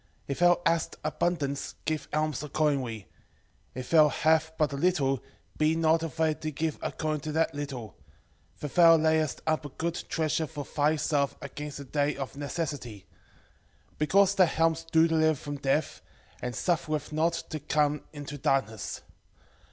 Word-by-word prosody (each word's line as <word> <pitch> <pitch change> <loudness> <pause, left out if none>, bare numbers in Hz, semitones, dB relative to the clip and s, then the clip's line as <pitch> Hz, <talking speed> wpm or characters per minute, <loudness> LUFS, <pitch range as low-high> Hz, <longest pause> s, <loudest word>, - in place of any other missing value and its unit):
4:8 - - -35 0.2
If 140 - -3
thou 175 0 +5
hast 165 -1 +1
abundance 155 -3 -1
give 155 -1 -2
alms 155 -1 0
accordingly: 140 -8 -1 0.7
if 130 -1 -6
thou 155 -2 +7
have 160 +2 +2
but 150 -2 +1
a - - -2
little, 140 - +1 0.4
be 155 +1 +3
not 165 0 +3
afraid 160 -1 -1
to 155 - -2
give 155 +1 -2
according 155 -2 -2
to 155 +1 -4
that 160 +1 +1
little: 140 -6 -5
4:9 - - -25 0.7
For 150 - -2
thou 165 +1 +7
layest 155 -2 +1
up 155 -1 +1
a 145 - -6
good 170 +5 -3
treasure 160 -1 0
for 145 -2 -6
thyself 145 -1 +1
against 145 +1 -7
the 140 - -8
day 145 +2 0
of 135 0 -5
necessity. 140 - -4 0.9
4:10 - - -30
Because 190 +6 +4
that 185 -5 +3
alms 165 0 +2
do 160 0 +5
deliver 160 -1 +3
from 145 +1 -6
death, 140 +2 0 0.4
and 125 -1 -4
suffereth 155 - -1
not 160 +2 +2 0.2
to 155 - -3
come 150 0 +1
into 145 -1 -7
darkness. 110 -6 -1
155 Hz, 160 wpm, -28 LUFS, 145-160 Hz, 0.9 s, thou